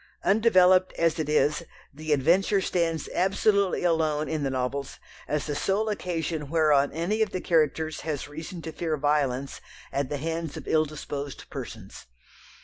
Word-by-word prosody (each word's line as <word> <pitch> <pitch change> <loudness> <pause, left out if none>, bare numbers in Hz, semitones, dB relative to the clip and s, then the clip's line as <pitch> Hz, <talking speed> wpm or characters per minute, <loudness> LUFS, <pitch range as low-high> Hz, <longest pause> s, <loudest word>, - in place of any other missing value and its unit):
Undeveloped 185 -4 +4
as 165 -1 +1
it 155 -2 -2
is, 150 0 +2 0.3
the 155 +2 -5
adventure 175 +8 +3
stands 170 -4 -1
absolutely 195 +1 +2
alone 155 -3 +1
in 155 -2 -2
the 140 - 0
novels 130 +2 -3 0.3
as 150 -1 -1
the 150 - -2
sole 200 +8 0
occasion 165 -7 -3
whereon 150 -3 +3
any 175 +8 -1
of 220 - +2
the 185 - -3
characters 160 -2 +1
has 150 -4 -3
reason 160 +3 -8
to 160 - -5
fear 160 -1 -2
violence 140 -2 0 0.3
at 140 -1 -1
the 145 - -2
hands 165 +1 -4
of - - -9
ill 155 0 +3
disposed 145 -2 -6
persons. - - -8
160 Hz, 155 wpm, -26 LUFS, 145-180 Hz, 0.3 s, Undeveloped